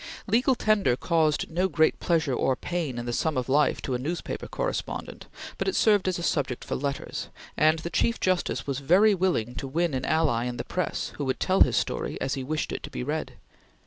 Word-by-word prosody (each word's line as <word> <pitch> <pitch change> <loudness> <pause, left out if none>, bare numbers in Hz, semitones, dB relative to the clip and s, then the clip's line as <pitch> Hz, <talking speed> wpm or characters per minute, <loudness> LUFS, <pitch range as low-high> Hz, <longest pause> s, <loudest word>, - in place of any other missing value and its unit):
Legal 245 +5 +3
Tender 205 - +2
caused 160 -2 +1
no 180 +3 +1
great 160 -2 +2
pleasure 160 -5 +1
or 130 +1 +1
pain 160 -5 -3
in 120 - -4
the 120 - -3
sum 155 +2 0
of 125 - -1
life 145 +2 +2
to 130 - -2
a 125 - -1
newspaper 165 +7 -4
correspondent, - - -4 0.3
but - - -1
it 385 - 0
served 205 -4 +4
as 185 - 0
a 175 - -5
subject 135 -7 -1
for - - -4
letters, 140 0 -3 0.3
and 155 +1 +4
the 170 +2 -5
Chief 230 +7 +1
Justice 185 -1 0
was 140 -1 -2
very 185 +10 +5
willing 175 - 0
to 135 - -5
win 165 +3 0
an 130 -1 -2
ally 145 -8 +1
in 125 -1 -3
the 120 - -3
press 180 - -2
who 145 - -2
would 130 - -1
tell 190 0 +1
his 125 -3 +5
story - - -2
as 135 - -1
he 135 - -3
wished 150 +3 -2
it - - -4
to - - -7
be 60 - -5
read. - - -3
155 Hz, 220 wpm, -27 LUFS, 130-180 Hz, 0.3 s, very